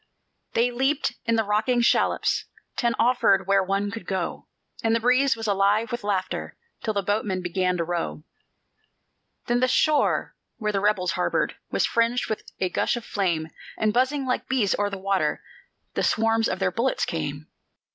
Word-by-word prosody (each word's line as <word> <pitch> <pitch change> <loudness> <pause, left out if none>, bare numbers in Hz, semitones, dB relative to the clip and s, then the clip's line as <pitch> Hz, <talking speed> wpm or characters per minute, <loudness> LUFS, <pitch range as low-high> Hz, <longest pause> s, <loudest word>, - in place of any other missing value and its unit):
They 240 +2 +2
leaped 265 +1 0
in 230 - +2
the 225 - +2
rocking 215 +4 +1
shallops. 235 - +2 0.3
Ten 235 -2 +1
offered 225 -6 +3
where 195 +1 +3
one 195 +2 -1
could 220 -4 -8
go; 190 -3 -3 0.4
And 225 0 +3
the - - +2
breeze 255 +3 +3
was 225 -1 -6
alive 205 +2 +2
with 240 -2 -4
laughter 195 -2 -2 0.2
Till 220 -2 -2
the 200 - 0
boatmen 195 -2 -1
began 180 0 0
to 170 - 0
row. 170 -2 -3 1.2
Then 240 0 +1
the 255 - +3
shore, 300 +3 +2 0.2
where 215 -2 -1
the 200 -1 -1
rebels 195 -3 +2
harbored, - - 0
Was - - +1
fringed 230 0 +1
with 215 - -5
a 185 - +1
gush - - 0
of 235 - -7
flame, 170 -6 -1 0.3
And 215 -1 +1
buzzing, 260 +3 +1
like 250 - -1
bees, 240 -7 +2
o'er 205 0 +1
the 200 - -5
water 195 0 0 0.5
The - - -1
swarms 225 0 +2
of - - -1
their - - 0
bullets 255 +3 0
came. 150 -2 -4
215 Hz, 175 wpm, -25 LUFS, 195-240 Hz, 1.2 s, offered